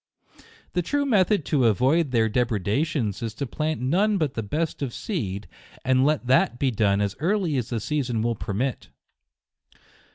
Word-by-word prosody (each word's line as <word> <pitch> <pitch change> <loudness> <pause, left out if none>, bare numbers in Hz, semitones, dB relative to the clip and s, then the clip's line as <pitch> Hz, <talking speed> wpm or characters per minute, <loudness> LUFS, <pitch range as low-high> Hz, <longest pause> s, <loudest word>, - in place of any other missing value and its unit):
The 180 - +1
true 285 - 0
method 205 - +2
to 135 -5 +2
avoid 135 - +2
their 115 -3 +2
depreda 110 - 0
tions 115 - -2
is 115 -1 -4
to 140 - -3
plant 155 +4 -2
none 195 +11 +2
but 155 -6 0
the 115 - -2
best 150 +11 -3
of 130 -4 -3
seed, 105 - -4 0.4
and 130 0 +3
let 150 -2 +1
that 125 -1 +3
be 135 0 +1
done 105 -3 +2
as 100 0 -1
early 175 -1 +1
as 125 -1 -2
the 115 - -1
season 120 -1 -1
will 120 0 +1
permit. 115 +6 -3
130 Hz, 170 wpm, -25 LUFS, 110-155 Hz, 0.4 s, and